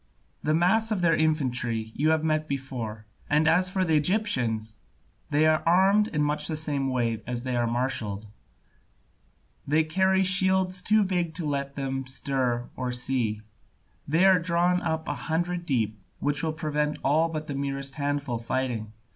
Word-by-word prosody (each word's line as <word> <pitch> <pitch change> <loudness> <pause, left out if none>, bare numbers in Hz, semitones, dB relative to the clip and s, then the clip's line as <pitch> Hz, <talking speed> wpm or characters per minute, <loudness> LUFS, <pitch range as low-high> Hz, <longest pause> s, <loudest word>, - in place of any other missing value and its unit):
The 155 +1 +1
mass 195 +7 +3
of 210 -4 -1
their 165 -2 +4
infantry 125 -8 0
you 155 +3 +1
have 160 0 +2
met 155 -1 0
before; 125 -6 -5 0.2
and 150 +1 +3
as 180 +3 +3
for 185 0 0
the 160 -2 +2
Egyptians, 125 - 0 0.5
they 150 +1 +3
are 155 0 +3
armed 195 +5 +4
in 150 -7 -1
much 150 +1 0
the 155 - -2
same 145 -3 -1
way 115 -3 -1
as 120 -1 -3
they 130 -1 -2
are 120 -1 +1
marshalled; 115 -4 -2 1.4
they 155 +3 +3
carry 190 +4 +2
shields 190 -1 +2
too 215 +3 +3
big 175 -4 -1
to 175 - -3
let 140 -1 -2
them 135 -1 -3
stir 130 -3 -1
or 125 -1 -3
see, 125 -4 -1 0.7
they 165 +6 +3
are 190 -1 +6
drawn 175 +1 +1
up 160 -1 -2
a - - -1
hundred 170 +6 -2
deep, 110 -6 0 0.2
which 145 0 0
will 160 - 0
prevent 150 -1 -1
all 160 +4 +3
but 155 -1 -4
the 145 - -5
merest 140 0 -2
handful 140 -4 -1
fighting. 115 -3 -3
150 Hz, 165 wpm, -26 LUFS, 130-170 Hz, 1.4 s, are